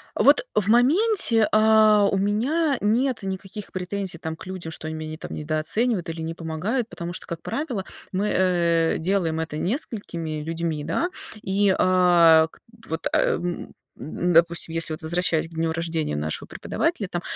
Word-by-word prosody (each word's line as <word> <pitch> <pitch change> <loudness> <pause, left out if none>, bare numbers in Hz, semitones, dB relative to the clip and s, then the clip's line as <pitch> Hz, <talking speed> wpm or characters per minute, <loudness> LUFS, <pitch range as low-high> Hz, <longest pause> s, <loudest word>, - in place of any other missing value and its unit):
Вот, - - +5
э, - - -4 0.2
в 200 - -3
моменте, 250 - +5
а, 215 -1 +5
у 195 - 0
меня 260 - +1
нет 240 +4 +1
никаких 195 +2 -6
претензий 185 -1 -3
там 160 -1 -5
к - - -11
людям, 185 -3 -6
что 155 - -7
они 160 - -5
меня 155 0 -6
не 155 - -7
там - - -8
недооценивают 165 +7 -1
или 165 0 -5
не 160 +1 -4
помогают, 175 +9 -3
потому 170 -4 -7
что, - - -10
как 170 -2 -6
правило, 265 -10 -3 0.3
мы, 195 +3 0
э, 170 -3 +2
делаем 165 -2 -1
это 160 -2 -5
несколькими 175 - -3
людьми, 160 -1 -3
да. 165 - -1 0.3
И, 195 0 +2
а, 175 -3 +5
к - - -22
т - - -58 0.3
Вот, 160 +1 -2
а, - - +4 0.2
м 175 0 -5 0.2
м 175 +4 -2
допустим, 170 0 +3
если 165 -1 +2
вот 155 - -7
возвращаясь 165 0 0
к - - -20
дню 160 0 0
рождения 165 - -2
нашего 75 +1 -4
преподавателя, - - -2
там - - -4
175 Hz, 175 wpm, -24 LUFS, 160-210 Hz, 0.3 s, Вот